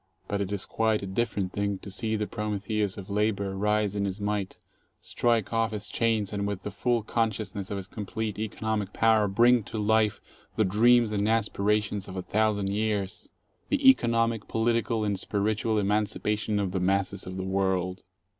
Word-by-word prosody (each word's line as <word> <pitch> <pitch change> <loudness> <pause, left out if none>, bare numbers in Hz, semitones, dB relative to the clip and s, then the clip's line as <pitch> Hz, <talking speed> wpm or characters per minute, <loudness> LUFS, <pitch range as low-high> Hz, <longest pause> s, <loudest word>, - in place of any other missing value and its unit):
But 100 -1 -1
it 100 0 -3
is 100 -2 +1
quite 110 -2 0
a - - -2
different 95 -1 -2
thing 100 -1 -1
to 100 - -9
see 110 +2 -2
the 105 0 -1
Prometheus 105 -1 -2
of 95 -2 -8
labor 100 -1 0
rise 105 0 +1
in 100 -1 0
his 95 +1 -3
might, 100 -2 -2 0.4
strike 115 -3 0
off 115 0 +2
his 105 -2 -5
chains, 110 -1 0
and 100 0 -1
with 100 -2 -4
the 105 - -4
full 115 +3 0
consciousness 110 -3 -2
of 100 - -3
his 95 -1 -6
complete 105 0 -4
economic 110 -1 -2
power 110 -2 +3
bring 120 +5 +4
to - - -6
life 105 0 +2 0.4
the 110 - +2
dreams 115 +3 +4
and 105 0 0
aspirations 105 -2 0
of 95 0 -7
a 90 - -3
thou 110 +1 +2
sand 100 -2 -2
years, 105 0 -2 0.2
— - - -42
the 285 -2 +2
economic, 115 - +3
political, 115 0 0
and 100 -2 -1
spiritual 110 +2 0
emancipation 105 +1 0
of 100 -2 -1
the 95 - -1
masses 95 +1 0
of 95 0 -6
the 95 - -3
world. 95 -1 0
105 Hz, 185 wpm, -27 LUFS, 100-110 Hz, 0.4 s, bring